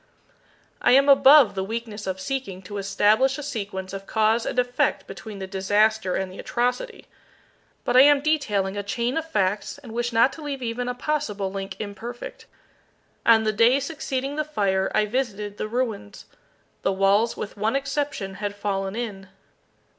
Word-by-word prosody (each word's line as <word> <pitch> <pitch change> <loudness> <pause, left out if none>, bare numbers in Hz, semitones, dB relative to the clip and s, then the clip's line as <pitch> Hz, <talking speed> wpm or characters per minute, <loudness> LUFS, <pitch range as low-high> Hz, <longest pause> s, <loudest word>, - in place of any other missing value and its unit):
I - - +4
am 275 +2 +5
above 275 -4 +7
the 190 -1 -2
weakness 220 0 -5
of 190 0 -3
seeking 195 -3 -4
to 205 +2 -6
establish 210 +7 +2
a 295 - -6
sequence 200 -8 -5
of 195 0 -7
cause 220 +1 +2
and - - -3
effect 245 0 +1
between 215 -3 -9
the 190 - -5
disaster 205 +1 +1
and 190 -1 -2
the 185 - -11
atrocity. 250 - -2 0.8
But 245 - 0
I 255 - +9
am 290 +1 +6
detailing 210 -11 0
a 205 - -2
chain 235 +5 -2
of 325 0 -3
facts, 205 -3 -1
and 265 -5 -12
wish 240 +1 -2
not 235 +3 +4
to 320 - -10
leave 280 -3 -5
even 245 +1 -3
a 250 - -3
possible 230 -9 -2
link 195 -1 -5
imperfect. 230 - -7 0.8
On 225 -1 +6
the 215 0 0
day 235 +5 +4
succeeding 280 -1 -4
the 305 - +1
fire, 195 -10 0
I 215 - +3
visited 210 -3 -3
the - - -3
ruins. 225 - -3 0.6
The - - +1
walls 195 +4 +2
with 205 - -6
one 215 +4 0
exception 275 -7 -2
had 205 -1 -3
fallen 195 -1 -2
in. 205 -5 -5
220 Hz, 170 wpm, -24 LUFS, 195-260 Hz, 0.8 s, I